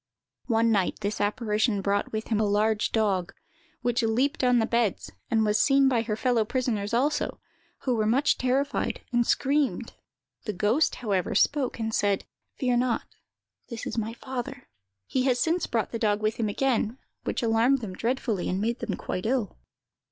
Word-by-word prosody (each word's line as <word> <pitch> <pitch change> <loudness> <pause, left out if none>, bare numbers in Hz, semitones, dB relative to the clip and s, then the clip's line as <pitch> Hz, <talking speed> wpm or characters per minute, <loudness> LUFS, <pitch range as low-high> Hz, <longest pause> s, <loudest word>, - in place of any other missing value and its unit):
"One 230 -1 +3
night 200 -4 +1
this 205 +1 -2
apparition 210 0 +1
brought 200 +1 0
with 220 0 -4
him 220 -2 +1
a - - +3
large 210 +1 +1
dog, 200 -5 0 0.5
which 245 0 +1
leaped 245 +5 +1
on 250 -1 +4
the 225 - +3
beds, 235 -4 0 0.2
and 220 -1 +2
was 210 0 +2
seen 275 -1 +4
by 245 -3 +2
her 220 -2 -2
fellow 240 0 +2
prisoners 215 -3 -1
also, 280 +6 0 0.4
who 255 - 0
were 215 -2 +1
much 265 +6 +2
terrified, 265 +3 0
and 240 -1 +2
screamed. 285 +1 +1 0.5
The 210 - -2
ghost, 215 - +2
however, 200 -6 -1
spoke, 285 -4 +2
and 225 -1 -3
said, 200 -2 +1 0.3
'Fear 250 -3 +1
not; 245 -1 0 0.6
this 230 -2 -6
is - - -4
my 225 0 -2
father.' 265 +2 -6 0.4
He 260 -1 0
had 255 -2 +3
since 330 +7 +1
brought 225 -2 -1
the 230 - -3
dog 210 -2 +2
with 215 +1 0
him 220 -3 0
again, 240 0 0 0.3
which - - -2
alarmed 230 +4 +3
them 205 -5 -5
dreadfully, 230 -3 -1
and 185 - -1
made 230 +4 -1
them 225 -5 -3
quite 185 +4 -3
ill. 240 -5 -1
230 Hz, 175 wpm, -27 LUFS, 215-255 Hz, 0.6 s, on